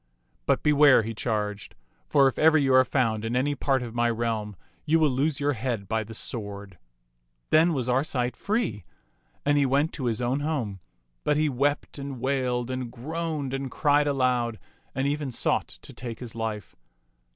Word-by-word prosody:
"But - - +2
beware," 145 -5 +6
he 115 +1 -4
charged, 105 -3 -3 0.3
for 140 -2 +5
if 135 - -2
ever 160 0 +6
you 135 -3 +2
are 130 0 +7
found 115 -4 0
in 115 +2 -2
any 140 +3 +1
part 135 -2 0
of 115 -2 -7
my 120 0 +2
reahii, 110 -3 -2 0.3
you 160 +1 +3
will 155 -3 +3
lose 140 +4 0
your 145 0 +1
head 115 -4 -3
by 110 0 0
the 110 +2 -10
sword." 100 -5 -6 0.7
Then 165 +2 +5
was 130 -6 -1
Arcite 125 -1 0
free, 205 - -1 0.6
and 145 0 +3
he 140 - +3
went 140 +4 +1
to 135 - -4
his 115 -3 0
own 125 +3 0
home; 135 -10 -2 0.4
but 150 - +2
he 155 0 +2
wept 140 +2 -1
and 140 -2 -6
wailed 125 -1 -1
and 130 -2 -4
groaned 150 +1 -4
and 135 0 -3
cried 145 +2 +2
aloud 125 -4 +1 0.4
and 135 - 0
even 145 -1 -1
sought 125 - 0
to - - -12
take 120 -2 -7
his 120 -3 -8
life. 110 -6 -4
130 Hz, 180 wpm, -26 LUFS, 115-145 Hz, 0.7 s, are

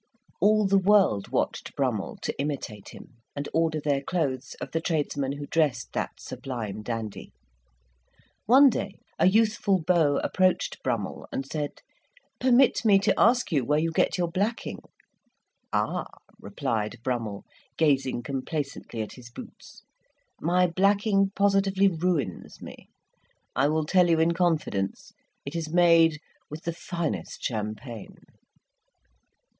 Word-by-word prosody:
All 215 +1 +4
the 195 0 +4
world 190 - +3
watched - - -2
Brummell - - -1
to - - -1
imitate 135 -8 -4
him, 125 - -14 0.2
and 140 0 -4
order 160 -1 +1
their 145 -2 0
clothes 140 -5 -2
of - - -6
the 165 - -1
tradesman 145 -4 -1
who 145 0 -6
dressed 145 -5 0
that - - -2
sublime 110 -6 -6
dandy. 110 -2 -5 1.2
One 265 +4 +7
day 200 -3 -4 0.2
a - - +5
youthful 215 -1 +3
beau 160 -5 +3
approached 185 -1 +1
Brummell 115 -6 -3
and 135 - -3
said, 145 +1 -5 0.6
"Permit 255 0 +4
me 205 -3 +6
to 195 - +2
ask 245 0 +3
you 145 -5 +2
where 150 +5 +1
you 165 +2 0
get 160 - +1
your 175 -1 +1
blacking?" 200 +7 -2 0.9
"Ah!" - - -1 0.3
replied 115 - -3
Brummell, 115 -6 -3 0.3
gazing 135 -6 +1
complacently 140 -4 -4
at 105 - -9
his 120 -2 -12
boots, 120 - -12 0.6
"my 180 +3 +3
blacking 195 +2 +2
positively 195 -1 +3
ruins 165 - -2
me. - - -11 0.7
I 135 - +3
will 155 +1 0
tell 180 +2 +4
you 165 -1 +3
in 165 +1 +3
confidence; 160 - -1 0.3
it 140 +4 -6
is 165 -2 -3
made 165 -2 +5 0.3
with 155 +2 -8
the 170 - -2
finest 170 -1 -4
champagne!" 110 0 -5
160 Hz, 130 wpm, -26 LUFS, 130-185 Hz, 1.2 s, One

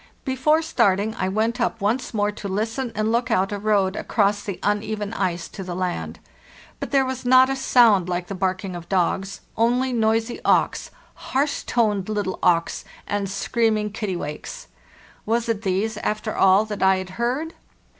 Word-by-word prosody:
Before 300 +4 +2
starting 220 -8 +1
I 185 -5 -2
went 225 +5 0
up 230 -1 0
once 225 +5 -1
more 205 -2 0
to 205 -1 -7
listen 225 +6 -2
and 215 +1 0
look 235 +1 0
out 195 -2 +1
a 205 - -3
road 200 -2 +1
across 205 -1 +1
the 200 -3 -5
uneven 210 0 -1
ice 180 -5 -2
to 195 - -7
the 180 -1 -5
land. 180 -1 -3 0.6
But - - -4
there 270 -1 +3
was 260 -1 -4
not 255 +1 +6
a - - 0
sound 230 -8 +4
like 175 0 -2
the 200 - -6
barking 185 0 -2
of 170 -1 -9
dogs, 190 +1 0
only 250 +3 +1
noisy 225 +1 +1
auks, - - +2 0.2
harsh 280 +2 -1
toned 210 -5 0
little 205 -3 -2
auks, 170 -1 +2 0.2
and 200 -1 -2
screaming 215 +1 0
kittiwakes. 200 - -5 0.6
Was 230 +2 +1
it 225 -3 -1
these, 205 +2 -1
after 215 +1 -2
all, 195 +2 +5
that 210 -1 -6
I 190 0 +5
had 185 -1 -5
heard? 280 +8 -1
210 Hz, 170 wpm, -23 LUFS, 195-235 Hz, 0.6 s, not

